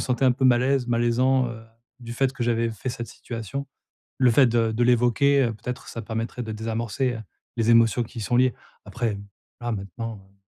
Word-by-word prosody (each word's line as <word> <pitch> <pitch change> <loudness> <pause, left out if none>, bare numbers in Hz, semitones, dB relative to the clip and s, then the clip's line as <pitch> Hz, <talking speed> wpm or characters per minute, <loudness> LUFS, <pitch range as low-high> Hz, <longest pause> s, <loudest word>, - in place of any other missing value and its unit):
sentais 130 +1 0
un 130 - +5
peu 130 +2 -2
mal 125 -1 +5
à 130 - +1
l'aise, 135 -3 +1
malaisant, 120 +2 +2
heu, 115 -1 -9 0.4
du 120 -1 -7
fait 135 +2 +1
que 130 - -5
j'avais 115 -1 +1
fait 115 +3 -6
cette 120 -1 -6
situation». 120 +5 -6 0.5
Le 125 -2 +5
fait 130 +2 +6
de 115 -1 +1
de 120 +2 +1
l'évoquer, 125 +4 +4
heu, 115 - -1
peut-être 125 +3 -7
ça 115 - -6
permettrait 115 +2 -4
de 110 - -5
désamorcer, 115 +3 -2
heu, 115 - -6 0.4
les 115 0 +1
émotions 115 +1 +4
qui 115 +1 -9
y - - -4
sont 120 +4 -1
liées. 130 -1 +4 0.3
Après, 115 -3 -2
hem, 100 0 -6 0.4
là, 120 0 -2
maintenant, 105 +3 -5
heu 95 0 -20
120 Hz, 220 wpm, -25 LUFS, 115-125 Hz, 0.5 s, fait